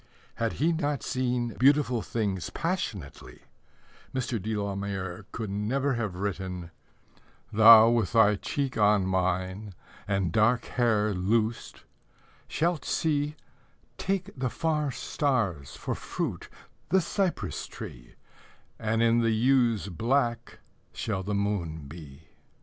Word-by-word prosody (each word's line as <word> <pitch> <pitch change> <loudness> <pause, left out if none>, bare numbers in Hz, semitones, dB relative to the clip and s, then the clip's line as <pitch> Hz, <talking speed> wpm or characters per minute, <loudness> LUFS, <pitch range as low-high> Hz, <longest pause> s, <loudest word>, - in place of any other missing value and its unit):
Had 115 -1 -1
he 160 +4 +1
not 145 -6 -1
seen 125 -2 -1
beautiful 135 -3 +4
things 100 -6 -2
passionately, 165 - -4 0.7
Mr. 125 -4 -2
de 110 +3 -2
la 100 -1 -2
Mare 95 -1 -5
could 110 -3 -4
never 130 +8 0
have 110 -6 -2
written: 95 -3 -4 0.8
Thou 110 +1 +9
with 115 -5 +1
thy 110 -2 +5
cheek 135 +2 -3
on 105 -2 +4
mine, 95 +2 -1 0.3
And 95 -4 0
dark 115 +4 +3
hair 110 -4 +1
loosed, 110 +5 -1 0.6
shalt 165 -3 0
see 150 -1 0 0.6
Take 195 0 -1
the 130 -2 -1
far 155 0 -1
stars 115 - -1
for - - -3
fruit - - -4 0.4
The 190 +3 +4
cypress 185 +1 -2
tree, - - -10 0.6
And 110 +1 +1
in 115 0 +4
the 115 -1 +2
yew's 115 -2 +2
black 120 - -1 0.3
Shall 105 -4 -2
the 100 +2 -2
moon 90 -7 -2
be. 75 -1 -12
110 Hz, 120 wpm, -28 LUFS, 95-130 Hz, 0.8 s, Thou